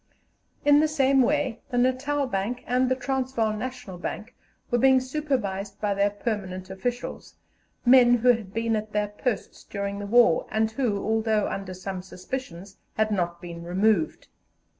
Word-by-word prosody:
In 290 0 +7
the 310 - +4
same 275 -3 +3
way 290 -2 +1
the 245 - -2
Natal 265 +3 +1
Bank 235 +1 -3
and 250 +1 +2
the 260 - +2
Transvaal 255 -4 -1
National 250 -4 -6
Bank 220 +6 -5 0.4
were 240 - +3
being 265 +1 +6
supervised 255 -8 -3
by 205 -1 0
their 200 +1 +2
permanent 190 -3 -4
officials, 245 +6 -4 0.5
men 245 -1 +7
who 245 +1 +2
had 225 -5 +2
been 225 +1 0
at 215 0 -4
their 210 0 0
posts 220 +2 -3
during 200 0 -4
the 205 - -5
war, 235 -6 +4
and 220 0 +1
who, 220 -4 -1
although 220 -1 +1
under 195 -1 -5
some 185 0 -5
suspicions, 190 0 -7 0.2
had 215 0 +1
not 175 -3 -1
been 170 -1 -7
removed. 180 0 +1
220 Hz, 160 wpm, -26 LUFS, 200-255 Hz, 0.5 s, In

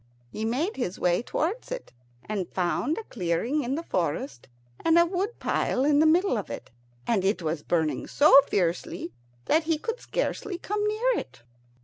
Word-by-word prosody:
He 220 - -3
made 275 - -1
his 240 -8 -2
way 175 +2 +2
towards 350 - -2
it, - - -6 0.3
and 200 -4 -3
found 190 - 0
a 450 - -4
clearing 225 - -1
in 255 +3 -1
the 330 - -4
forest, 145 - -2 0.4
and 330 0 +4
a 340 - +7
wood 380 +6 -2
pile 260 - 0
in 290 0 +4
the 315 - +5
middle 340 - +3
of 200 - -7
it, - - -7 0.3
and 215 -5 +1
it 190 -2 +1
was 155 -1 -2
burning 160 -1 0
so 285 -1 +7
fiercely 175 -2 -1 0.3
that 315 +1 +2
he 320 -1 +1
could 455 +9 -4
scarcely 420 -6 -3
come 415 +3 -2
near 460 +3 +1
it. 130 -2 -11
270 Hz, 175 wpm, -27 LUFS, -, 0.4 s, a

